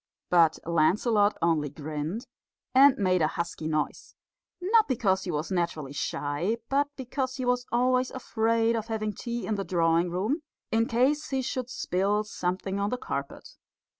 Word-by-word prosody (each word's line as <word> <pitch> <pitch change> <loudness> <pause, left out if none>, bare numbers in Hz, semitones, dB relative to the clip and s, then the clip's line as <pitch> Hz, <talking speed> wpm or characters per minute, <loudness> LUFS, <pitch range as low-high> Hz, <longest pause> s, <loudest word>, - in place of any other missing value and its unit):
But 165 -3 +5
Lancelot 205 +6 +3
only 160 -3 +2
grinned 155 - -5 0.5
and 270 +1 +7
made 185 -3 +2
a 155 - +4
husky 170 -1 -4
noise 155 -1 -2 0.4
not 425 +5 +4
because 200 -7 +1
he - - -4
was 155 0 -2
naturally 170 -6 -2
shy, 145 +8 -2
but 280 +1 +2
because 260 0 -3
he 260 -2 -3
was 245 0 0
always 255 +2 +2
afraid 230 -2 +1
of 225 -1 -3
having 215 -2 -2
tea 235 +2 -4
in 220 - -1
the 200 -1 -2
drawing 170 -1 +2
room, 210 - -1 0.3
in 225 +1 +2
case 270 +6 +1
he 265 -1 -1
should 255 0 -3
spill 200 0 0
something 190 -1 -3
on 200 +1 0
the 250 - -2
carpet. 140 - -5
210 Hz, 160 wpm, -28 LUFS, 170-250 Hz, 0.5 s, and